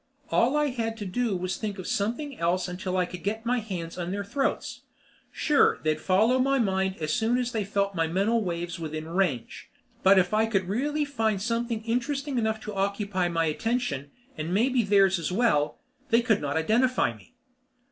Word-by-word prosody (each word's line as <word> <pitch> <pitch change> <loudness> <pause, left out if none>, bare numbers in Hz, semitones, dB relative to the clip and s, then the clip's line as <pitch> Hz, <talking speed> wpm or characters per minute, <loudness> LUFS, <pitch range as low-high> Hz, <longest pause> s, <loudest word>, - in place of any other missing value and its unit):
All 255 +6 +3
I 300 -1 +2
had 225 -3 -3
to 210 - -5
do 215 +1 -1
was 185 +1 -2
to - - -5
think 210 -2 -3
of 185 - -7
something 240 +8 -2
else 175 +2 +1
until 185 +1 -3
I 180 - +2
could 180 0 -9
get 220 +3 -2
my 245 +1 +1
hands 180 -6 -6
on 175 0 -3
their 200 +2 -2
throats. 270 +7 -2 0.5
Sure, 295 -2 +3
they'd 155 0 0
follow 220 +9 +3
my 275 +1 +3
mind 190 -4 +1
as 155 -1 -2
soon 230 +2 +2
as 245 -1 -1
they 220 -3 -1
felt 200 0 -1
my 165 -2 0
mental 205 +7 +1
waves 175 -1 -4
within 155 -1 -5
range, 165 -9 -2 0.3
but 195 +1 +6
if 180 +1 +3
I 220 +1 +3
could 195 -5 0
really 290 +9 0
find 225 -7 0
something 230 +1 -2
interesting 260 +3 -1
enough 220 -1 0
to 215 - -6
occupy 200 -1 -1
my 165 -1 0
attention 160 - -1 0.3
and 155 +2 -4
maybe 245 +6 +3
theirs 195 -3 +4
as 165 +1 -3
well 180 -9 +2 0.3
they 235 -1 +4
could 220 -4 +2
not 145 +1 -1
identify 225 - +2
me. 100 -4 -20
200 Hz, 195 wpm, -27 LUFS, 180-235 Hz, 0.5 s, but